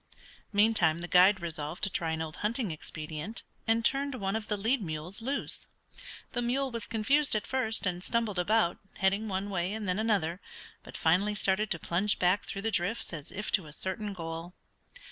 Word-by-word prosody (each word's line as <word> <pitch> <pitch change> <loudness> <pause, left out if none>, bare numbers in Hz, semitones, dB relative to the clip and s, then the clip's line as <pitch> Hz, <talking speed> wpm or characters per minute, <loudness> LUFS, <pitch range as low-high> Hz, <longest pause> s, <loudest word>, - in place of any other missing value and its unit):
Meantime 205 -7 +4
the 175 +1 -4
guide 185 +3 +6
resolved 155 0 -4
to 195 - +4
try 165 -2 -1
an 160 0 -1
old 155 -1 -7
hunting 220 -1 -1
expedient, 155 +5 -5 0.2
and 225 +1 +2
turned 280 0 +2
one 195 -3 -1
of 220 -1 -3
the 210 - 0
lead 230 +5 +1
mules 165 +4 -4
loose. 270 +5 -3 0.6
The 245 - -1
mule 260 +3 0
was 230 -2 -4
confused 260 +5 +2
at 210 - 0
first, 235 -5 0
and 180 -1 -1
stumbled 225 -5 0
about, 190 -1 +2 0.2
heading 200 +3 +1
one 195 0 -2
way 180 0 0
and 215 -2 -4
then 180 +2 +1
another, 195 -6 +1 0.4
but - - -9
finally 190 +6 +3
started 200 +1 +2
to 170 - 0
plunge 185 +6 +1
back 180 +3 +2
through 195 - -5
the 225 - 0
drifts 185 +2 0
as 155 -2 -7
if 205 +2 -4
to 185 -7 +2
a 150 - -8
certain 205 +5 -3
goal. 165 0 -6
200 Hz, 190 wpm, -30 LUFS, 175-225 Hz, 0.6 s, guide